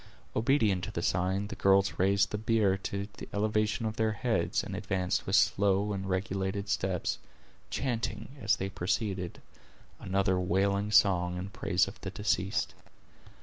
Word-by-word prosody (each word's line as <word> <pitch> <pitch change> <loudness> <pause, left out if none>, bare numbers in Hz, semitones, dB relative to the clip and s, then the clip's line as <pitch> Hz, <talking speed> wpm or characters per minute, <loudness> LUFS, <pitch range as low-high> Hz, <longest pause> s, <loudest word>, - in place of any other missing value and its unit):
Obedient 110 -6 +2
to 110 - -6
the 85 - -3
sign, 95 +3 0
the 105 - -6
girls 100 0 +3
raised 100 +2 +3
the 105 - -2
bier 110 -3 +2
to 100 +1 -4
the - - -8
elevation 105 +1 0
of 110 0 -3
their 110 -1 +1
heads, 110 -5 0
and 100 - -5
advanced 95 -3 -1
with 95 - +2
slow 100 +1 +3
and 95 0 -4
regulated 95 +1 -2
steps, 95 -2 -1 0.5
chanting, 115 0 -3
as 105 - +3
they 95 - -3
proceeded, 95 -1 -2 0.6
another 95 -1 +1
wailing 100 +3 +1
song 90 -4 +3
in 95 +2 -5
praise 90 - +1
of - - -10
the - - -4
deceased. - - -1
100 Hz, 150 wpm, -30 LUFS, 95-105 Hz, 0.6 s, girls